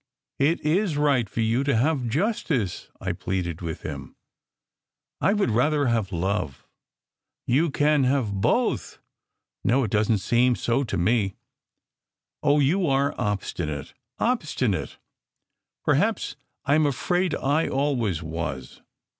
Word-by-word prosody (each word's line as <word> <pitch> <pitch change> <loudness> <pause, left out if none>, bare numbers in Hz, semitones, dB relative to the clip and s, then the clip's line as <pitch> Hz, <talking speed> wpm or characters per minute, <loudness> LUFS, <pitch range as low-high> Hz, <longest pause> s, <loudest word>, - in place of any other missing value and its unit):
" - - -58
"It 165 - 0
is 165 +1 +1
right 140 -7 +2
for 115 - -2
ygu 115 +4 +1
to 140 - +2
have 130 +1 +1
justice!" 150 - -1
I - - -2
pleaded 90 -3 -3
with 80 -2 -5
him. 70 -3 -7 1.0
"I 200 - +3
would 205 - +1
rather 145 +6 +2
have 115 -5 0
love." 90 -5 -2 0.8
"You 150 +7 +2
can 145 0 +2
have 130 -7 0
both!" 95 0 0 0.7
"No. 130 +3 +3
It 110 - -3
doesn 110 +1 +2
t - - -9
seem 125 +1 +4
so 120 +4 0
to 100 -6 -3
me." 95 +2 +1 1.1
"Oh, 145 0 +3
you 165 +6 +2
are 140 +1 +2
obstinate 85 -8 -3 0.2
obstinate!" 130 - -1 0.9
"Perhaps! - - +1 0.3
I 140 - +3
m 155 0 +4
afraid 175 +6 0
I 145 +4 +1
always 120 - 0
was. 75 -6 -5
125 Hz, 130 wpm, -25 LUFS, 100-145 Hz, 1.1 s, seem